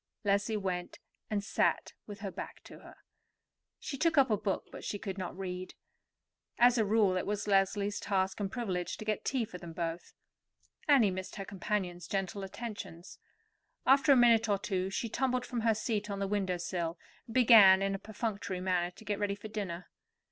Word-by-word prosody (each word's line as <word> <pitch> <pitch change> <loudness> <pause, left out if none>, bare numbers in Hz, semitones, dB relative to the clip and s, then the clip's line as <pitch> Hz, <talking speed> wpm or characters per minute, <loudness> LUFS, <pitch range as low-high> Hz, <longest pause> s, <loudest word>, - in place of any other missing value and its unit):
Leslie 205 +2 +1
went 180 -3 -3 0.3
and 205 -2 -1
sat 210 - 0
with 205 -1 -9
her 195 -2 -4
back - - -8
to - - -12
her. - - -14 0.8
She 275 - -6
took 330 -2 +2
up 265 -4 +5
a - - +5
book, 200 -1 -2
but - - -9
she 205 - -3
could 195 -1 -5
not 180 -1 -5
read. 185 -1 -5 0.8
As 245 0 +5
a 220 - +3
rule, 205 -2 +3
it - - -2
was 205 0 -2
Leslie's 200 +1 +1
task 190 -1 -1
and 195 -2 -2
privilege 190 -8 -3
to 215 - -8
get 215 -1 -1
tea 255 -4 0
for 180 -4 -9
them 170 -2 -9
both. 165 0 -4 0.7
Annie 260 -9 +5
missed 185 0 -6
her 195 - -5
companion's 185 -3 -3
gentle 195 +1 -2
attentions. 195 -4 -8 0.7
After 275 +2 +5
a - - +8
minute 230 -2 +5
or 200 - +3
two 190 -2 -2
she 210 +4 -2
tumbled 255 +2 0
down - - -10
from 245 - -1
her 225 -1 +3
seat 210 -1 -2
on 200 - -3
the 200 - -1
window 190 -3 0
sill, 170 -1 -3 0.3
and 225 - -10
began 215 -6 +8
in 195 0 0
a 195 - -3
perfunctory 205 -3 -4
manner 180 -1 0
to 180 +5 -16
get 205 -1 -2
ready 205 -1 0
for 210 +2 -9
dinner. 195 -5 -5
200 Hz, 195 wpm, -32 LUFS, 185-220 Hz, 0.8 s, a